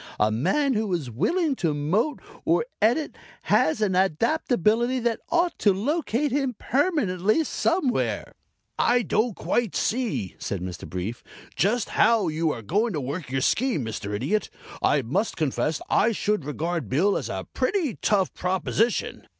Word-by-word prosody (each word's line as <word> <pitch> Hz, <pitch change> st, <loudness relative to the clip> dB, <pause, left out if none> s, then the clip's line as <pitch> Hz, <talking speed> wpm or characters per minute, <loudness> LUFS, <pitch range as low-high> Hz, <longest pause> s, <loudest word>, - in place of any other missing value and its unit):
A 105 Hz, +1 st, +3 dB
man 275 Hz, -, +1 dB
who 215 Hz, -3 st, -1 dB
is 140 Hz, -8 st, -4 dB
willing 315 Hz, -, +1 dB
to 160 Hz, -4 st, 0 dB
mote 190 Hz, -, 0 dB, 0.2 s
or 475 Hz, -, +2 dB, 0.2 s
Edit 245 Hz, +8 st, +2 dB, 0.3 s
has 280 Hz, -8 st, +2 dB
an 195 Hz, -4 st, +1 dB
adaptability 230 Hz, -, +2 dB
that 235 Hz, -1 st, 0 dB
ought 345 Hz, +1 st, +1 dB
to 205 Hz, -, +4 dB
locate 285 Hz, -, 0 dB
him 270 Hz, -2 st, 0 dB
permanently 255 Hz, -, +1 dB
somewhere." 315 Hz, -4 st, 0 dB, 0.5 s
"I 245 Hz, 0 st, +3 dB
don't 220 Hz, 0 st, 0 dB
quite 235 Hz, -5 st, -1 dB
see," 225 Hz, -, -1 dB
said 100 Hz, -, -3 dB
Mr. 90 Hz, -3 st, -7 dB
Brief, 90 Hz, +7 st, -4 dB, 0.3 s
"just 220 Hz, +5 st, +1 dB
how 220 Hz, -6 st, +3 dB
you 160 Hz, +1 st, 0 dB
are 115 Hz, -, -6 dB
going 210 Hz, -, 0 dB
to 155 Hz, -, -1 dB
work 140 Hz, +4 st, -5 dB
your 135 Hz, 0 st, -1 dB
scheme, 225 Hz, -, +1 dB
Mr. 105 Hz, -2 st, -4 dB
Idiot. 165 Hz, -, -1 dB, 0.3 s
I 140 Hz, -, +2 dB
must 185 Hz, -, -1 dB
confess 155 Hz, 0 st, -1 dB
I 230 Hz, +2 st, +3 dB
should 210 Hz, -6 st, -1 dB
regard 155 Hz, -, -3 dB
Bill 190 Hz, -, +2 dB
as -, -, -3 dB
a -, -, -4 dB
pretty 360 Hz, -, 0 dB
tough 195 Hz, -3 st, +2 dB
proposition." 190 Hz, +5 st, -1 dB
210 Hz, 150 wpm, -25 LUFS, 150-245 Hz, 0.5 s, to